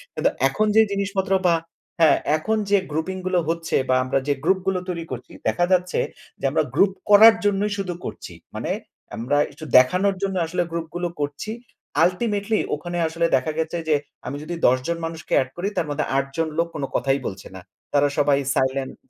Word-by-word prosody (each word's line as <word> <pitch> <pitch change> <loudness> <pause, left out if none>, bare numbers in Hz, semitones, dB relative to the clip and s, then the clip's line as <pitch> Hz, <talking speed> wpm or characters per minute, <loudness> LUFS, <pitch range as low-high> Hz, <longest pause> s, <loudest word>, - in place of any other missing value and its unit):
কিন্তু - - -4 0.2
এখন 215 +10 0
যেই 220 -1 +6
জিনিসপত্র 195 -1 -1 0.2
বা 170 - +4 0.5
হ্যাঁ, 160 - +6 0.2
এখন 220 +8 -1
যে, 205 - +5
grouping 160 +5 -2
গুলো 185 -1 +2
হচ্ছে 165 0 -1
বা 130 - +4
আমরা 130 +1 0
যে, 145 - +3
গ্রুপগুলো 190 +1 +1
তৈরি 170 -2 -3
করছি 125 -1 -7 0.2
দেখা 175 +11 +2
যাচ্ছে 180 0 +2 0.4
যে, - - -4
আমরা - - +2
গ্রুপ 195 -1 +4 0.2
করার 220 +2 +9
জন্যই 205 +1 +1
শুধু 185 -3 -3
করছি। - - -7 0.2
মানে - - -3 0.4
আমরা 130 +6 0
একটু 155 - -10
দেখানোর 185 +10 +4
জন্য 195 -1 -1
আসলে 175 +2 -1
গ্রুপগুলো 170 +1 -3
করছি। 145 +9 -3 0.5
ultimately 205 +3 0 0.2
ওখানে 175 +4 -5
আসলে 165 +1 -1
দেখা 135 +4 0
গেছে 160 +1 -1
যে, 150 - +5 0.3
আমি 130 - -4
যদি 170 +2 -5
১০ 130 - +4
জন 170 - -1
মানুষকে 165 -2 -6
এড 130 - -4
করি 185 +3 -2
তার 160 - 0
মধ্যে 145 +1 -1
৮ 135 - +1
জন 165 - +1
লোক 170 +1 +2
কোন 145 - -3
কথাই 135 0 +1
বলছে 95 -1 -7
না। 95 - -8 0.3
তারা 145 0 +4
সবাই 145 -1 +3 0.2
সাইলেন্ট। 130 0 0
170 Hz, 185 wpm, -23 LUFS, 145-190 Hz, 0.5 s, করার